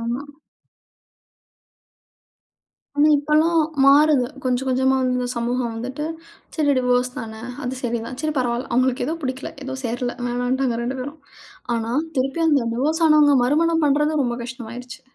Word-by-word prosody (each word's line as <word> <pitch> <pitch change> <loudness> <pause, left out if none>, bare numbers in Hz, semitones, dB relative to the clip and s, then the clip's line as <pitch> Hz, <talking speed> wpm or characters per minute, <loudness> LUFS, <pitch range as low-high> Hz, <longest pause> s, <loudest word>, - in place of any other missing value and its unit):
ஆமா. 235 +4 -3 2.7
ஆனா, 295 +1 +5
இப்பலாம் 310 +3 +2 0.3
மாறுது. 285 -1 +5 0.2
கொஞ்சம், 255 +1 0
கொஞ்சமா 265 +1 +2
இந்தச் 250 0 -1
சமூகம் 240 +1 -1
வந்துட்டு, 260 +6 -5 0.5
சரி 295 -3 +3
டிவோர்ஸ்தானே 250 -3 -1 0.2
அது 250 +1 -2
சரிதான். 235 +1 -3
சரி 310 - 0
பரவாயில்ல, 245 0 -1
அவங்களுக்கு 255 +2 +1
ஏதோ 320 - -1
பிடிக்கல, 260 0 -4
ஏதோ 265 0 -4
சேரல, 245 +1 -2
வேணாம்ன்டா 245 +2 0
வேற 230 - -3
2 260 +2 -3
பேரும். 285 +4 -7 0.6
ஆனா, 230 0 -3 0.2
திருப்பி 270 +5 0
அந்த 280 -7 +3
டிவோர்ஸ் 310 +7 0
ஆனவங்க 300 -2 +5
மறுமணம் 325 +4 +2
பண்றது 300 +2 +2
ரொம்ப 240 -1 -1
கஷ்டமாயிருச்சு. 245 0 -8
255 Hz, 130 wpm, -22 LUFS, 245-290 Hz, 2.7 s, ஆனா